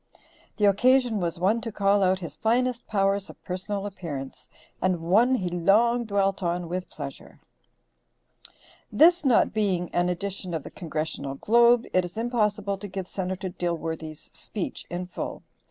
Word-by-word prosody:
The 210 Hz, -, +3 dB
occasion 245 Hz, +2 st, +4 dB
was 170 Hz, -2 st, -2 dB
one 200 Hz, +7 st, +2 dB
to 225 Hz, -, -5 dB
call 200 Hz, 0 st, +2 dB
out 190 Hz, 0 st, +3 dB
his 155 Hz, -4 st, -6 dB
finest 240 Hz, +5 st, 0 dB
powers 195 Hz, -1 st, +1 dB
of -, -, -12 dB
personal 195 Hz, +2 st, -4 dB
appearance, 160 Hz, -9 st, -7 dB, 0.3 s
and 185 Hz, -2 st, +1 dB
one 215 Hz, +10 st, +3 dB
he 185 Hz, -7 st, -2 dB
long 215 Hz, +8 st, +3 dB
dwelt 200 Hz, -2 st, 0 dB
on 175 Hz, -1 st, -1 dB
with 180 Hz, +2 st, -4 dB
pleasure. 140 Hz, -3 st, -9 dB, 1.5 s
This 330 Hz, +10 st, +5 dB
not 255 Hz, -5 st, +3 dB
being 190 Hz, -5 st, 0 dB
an 175 Hz, 0 st, +2 dB
edition 185 Hz, 0 st, -3 dB
of 155 Hz, -, -3 dB
the -, -, -9 dB
Congressional 155 Hz, -4 st, -4 dB
Globe 235 Hz, -, +4 dB
it 185 Hz, -, +4 dB
is 175 Hz, +3 st, -8 dB
impossible 210 Hz, -4 st, 0 dB
to 205 Hz, -, -6 dB
give 190 Hz, -1 st, -5 dB
Senator 190 Hz, 0 st, -3 dB
Dilworthy's 165 Hz, -3 st, -4 dB
speech 205 Hz, -, -5 dB
in 175 Hz, +1 st, -4 dB
full. 180 Hz, -, -6 dB
195 Hz, 155 wpm, -26 LUFS, 175-215 Hz, 1.5 s, This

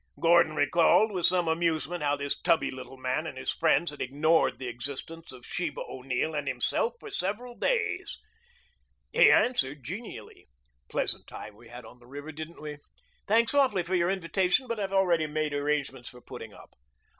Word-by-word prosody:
Gordon 170 Hz, -2 st, +5 dB
recalled 175 Hz, +7 st, +4 dB
with 180 Hz, -3 st, +2 dB
some 180 Hz, -2 st, +1 dB
amusement 165 Hz, 0 st, 0 dB
how 145 Hz, -1 st, +2 dB
this 140 Hz, 0 st, -2 dB
tubby 170 Hz, -2 st, +2 dB
little 130 Hz, 0 st, -9 dB
man 130 Hz, +5 st, -1 dB
and 130 Hz, -, -7 dB
his 130 Hz, -, -2 dB
friends 165 Hz, 0 st, +2 dB
had 145 Hz, -, -9 dB
ignored 155 Hz, +5 st, +2 dB
the 130 Hz, -, -6 dB
existence 140 Hz, +7 st, -6 dB
of 125 Hz, -2 st, -12 dB
Sheba 170 Hz, -4 st, -3 dB
O'Neill 130 Hz, +4 st, -2 dB
and 145 Hz, -2 st, -3 dB
himself 135 Hz, -, 0 dB
for -, -, -10 dB
several 210 Hz, +7 st, -3 dB
days. 445 Hz, -, -1 dB, 1.0 s
He -, -, +7 dB
answered 145 Hz, -, +2 dB
genially. 210 Hz, -, -8 dB, 0.4 s
"Pleasant -, -, -1 dB
time 105 Hz, -, -9 dB
we 115 Hz, +2 st, -16 dB
had 120 Hz, 0 st, -10 dB
on 120 Hz, +2 st, -14 dB
the 120 Hz, -, -19 dB
river, 145 Hz, +4 st, -8 dB
didn't 155 Hz, +2 st, -8 dB
we? 150 Hz, -1 st, -6 dB, 0.5 s
Thanks 225 Hz, +4 st, +3 dB
awfully 265 Hz, -10 st, +3 dB
for 175 Hz, +2 st, -5 dB
your 175 Hz, -1 st, +3 dB
invitation, 190 Hz, +5 st, +1 dB
but 230 Hz, -2 st, -3 dB
I've 195 Hz, -1 st, -2 dB
already 175 Hz, -5 st, +3 dB
made 155 Hz, -1 st, -2 dB
arrangements 145 Hz, -3 st, -1 dB
for 125 Hz, -, -14 dB
putting 120 Hz, -3 st, -9 dB
up." -, -, -15 dB
155 Hz, 175 wpm, -28 LUFS, 135-180 Hz, 1.0 s, He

